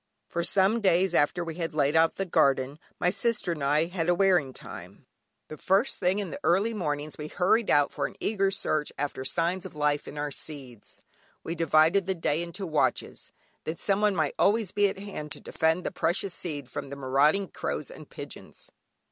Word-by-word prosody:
For 170 Hz, -, -2 dB
some 200 Hz, +6 st, +3 dB
days 185 Hz, -2 st, +3 dB
after 170 Hz, +2 st, +2 dB
we 165 Hz, -1 st, -5 dB
had 165 Hz, -3 st, -3 dB
laid 145 Hz, 0 st, +2 dB
out 165 Hz, 0 st, +4 dB
the 195 Hz, -, -2 dB
garden, 140 Hz, -4 st, +2 dB, 0.2 s
my 180 Hz, -, +2 dB
sister 220 Hz, -4 st, 0 dB
and 150 Hz, -4 st, -4 dB
I 150 Hz, +3 st, +3 dB
had 175 Hz, -1 st, -2 dB
a 175 Hz, -, +4 dB
wearing 175 Hz, -7 st, +3 dB
time. -, -, -10 dB, 0.4 s
The 155 Hz, -, -9 dB
first 195 Hz, +8 st, +1 dB
thing 185 Hz, +1 st, +2 dB
in 200 Hz, -3 st, -3 dB
the -, -, -6 dB
early 200 Hz, +6 st, +2 dB
mornings 150 Hz, -7 st, -3 dB
we 150 Hz, -, -4 dB
hurried 195 Hz, +7 st, +2 dB
out 145 Hz, -1 st, +4 dB
for -, -, -1 dB
an -, -, -13 dB
eager 195 Hz, -2 st, +1 dB
search 155 Hz, -6 st, -1 dB
after 140 Hz, -2 st, -3 dB
signs 170 Hz, +7 st, -1 dB
of 190 Hz, -5 st, -9 dB
life 150 Hz, -1 st, 0 dB
in 150 Hz, -, -8 dB
our 145 Hz, 0 st, -2 dB
seeds. 135 Hz, -7 st, -8 dB, 0.4 s
We 165 Hz, -, -3 dB
divided 165 Hz, +3 st, +3 dB
the 190 Hz, -, 0 dB
day 160 Hz, -2 st, 0 dB
into 170 Hz, +3 st, -5 dB
watches, 155 Hz, -3 st, -1 dB, 0.3 s
that 160 Hz, +1 st, -3 dB
someone 205 Hz, 0 st, +2 dB
might 155 Hz, -4 st, 0 dB
always 210 Hz, -2 st, +3 dB
be 205 Hz, 0 st, +3 dB
at -, -, -6 dB
hand 195 Hz, -7 st, -7 dB
to -, -, -11 dB
defend 160 Hz, +3 st, 0 dB
the -, -, -2 dB
precious 175 Hz, +3 st, 0 dB
seed 145 Hz, -7 st, -5 dB
from 130 Hz, -, -6 dB
the 140 Hz, -, -6 dB
marauding 140 Hz, +8 st, +2 dB
crows 70 Hz, -, -4 dB
and -, -, -12 dB
pigeons. -, -, -10 dB
165 Hz, 200 wpm, -28 LUFS, 150-190 Hz, 0.4 s, out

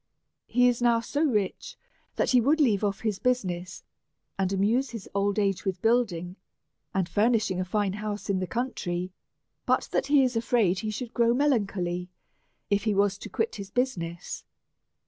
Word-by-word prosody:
He 245 Hz, +2 st, +4 dB
is 245 Hz, -1 st, +1 dB
now 235 Hz, -1 st, +4 dB
so 285 Hz, +6 st, -1 dB
rich, 240 Hz, -, -1 dB, 0.4 s
that -, -, +1 dB
he 250 Hz, -2 st, +5 dB
would 295 Hz, +7 st, +3 dB
leave 220 Hz, -9 st, +3 dB
off 200 Hz, -1 st, -1 dB
his 215 Hz, -3 st, -1 dB
busi 250 Hz, -2 st, +1 dB
ness, 180 Hz, 0 st, -5 dB, 0.5 s
and 190 Hz, -1 st, 0 dB
amuse 220 Hz, +8 st, +1 dB
his 225 Hz, -5 st, -8 dB
old 200 Hz, +1 st, +1 dB
age 200 Hz, -3 st, +1 dB
with 190 Hz, -3 st, -2 dB
building 200 Hz, -7 st, +1 dB, 0.5 s
and 190 Hz, -2 st, 0 dB
furnish 220 Hz, +1 st, +2 dB
ing 185 Hz, -, -2 dB
a 185 Hz, -, -1 dB
fine 200 Hz, 0 st, 0 dB
house 210 Hz, 0 st, -4 dB
in 195 Hz, -2 st, +1 dB
the 185 Hz, -, -2 dB
country, 185 Hz, -7 st, -3 dB, 0.6 s
but -, -, +2 dB
that -, -, 0 dB
he 285 Hz, -1 st, +5 dB
is 250 Hz, -2 st, 0 dB
afraid 225 Hz, -5 st, +2 dB
he 215 Hz, -, -3 dB
should 235 Hz, +3 st, -5 dB
grow 235 Hz, 0 st, +3 dB
melancholy, 195 Hz, -10 st, 0 dB, 0.6 s
if 200 Hz, +1 st, +2 dB
he 215 Hz, -2 st, +2 dB
was 200 Hz, 0 st, +2 dB
to -, -, -8 dB
quit 450 Hz, -, -2 dB
his 200 Hz, -1 st, -7 dB
busi 250 Hz, -2 st, 0 dB
ness. 170 Hz, 0 st, -6 dB
210 Hz, 185 wpm, -27 LUFS, 190-245 Hz, 0.6 s, he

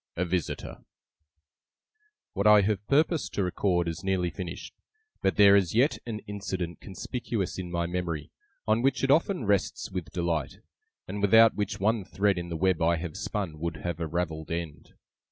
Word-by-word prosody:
A 90 Hz, -, 0 dB
VISITOR 90 Hz, -1 st, -3 dB, 1.5 s
What 100 Hz, +1 st, +1 dB
I 105 Hz, -1 st, +8 dB
have 100 Hz, 0 st, 0 dB
purposed 155 Hz, +3 st, +1 dB
to 100 Hz, -, +1 dB
record 90 Hz, -1 st, 0 dB
is 85 Hz, +2 st, -4 dB
nearly 95 Hz, -2 st, 0 dB
finished; 90 Hz, -3 st, -7 dB, 0.5 s
but -, -, +1 dB
there 100 Hz, -1 st, +7 dB
is 95 Hz, -1 st, +2 dB
yet 130 Hz, +6 st, +3 dB
an 110 Hz, -2 st, -4 dB
incident 95 Hz, -4 st, -4 dB
conspicuous 105 Hz, -1 st, -4 dB
in 90 Hz, -1 st, -5 dB
my 85 Hz, 0 st, -1 dB
memory, 85 Hz, -4 st, -3 dB, 0.4 s
on 110 Hz, +2 st, +3 dB
which 135 Hz, +2 st, +1 dB
it 135 Hz, -, +3 dB
often 160 Hz, -, +2 dB
rests 100 Hz, -1 st, 0 dB
with 90 Hz, -5 st, -4 dB
delight, 85 Hz, -5 st, -2 dB, 0.5 s
and 100 Hz, +2 st, -4 dB
without 110 Hz, +3 st, +6 dB
which 105 Hz, -2 st, -3 dB
one 110 Hz, +1 st, +1 dB
thread 100 Hz, 0 st, 0 dB
in 85 Hz, 0 st, -6 dB
the 85 Hz, -, -3 dB
web 95 Hz, -1 st, +1 dB
I 85 Hz, +1 st, +3 dB
have 80 Hz, -1 st, -5 dB
spun 90 Hz, -7 st, -4 dB
would 85 Hz, +1 st, -3 dB
have 85 Hz, -2 st, -4 dB
a 85 Hz, -, -2 dB
ravelled 80 Hz, -1 st, -3 dB
end. 85 Hz, -3 st, -6 dB
95 Hz, 170 wpm, -28 LUFS, 85-105 Hz, 1.5 s, I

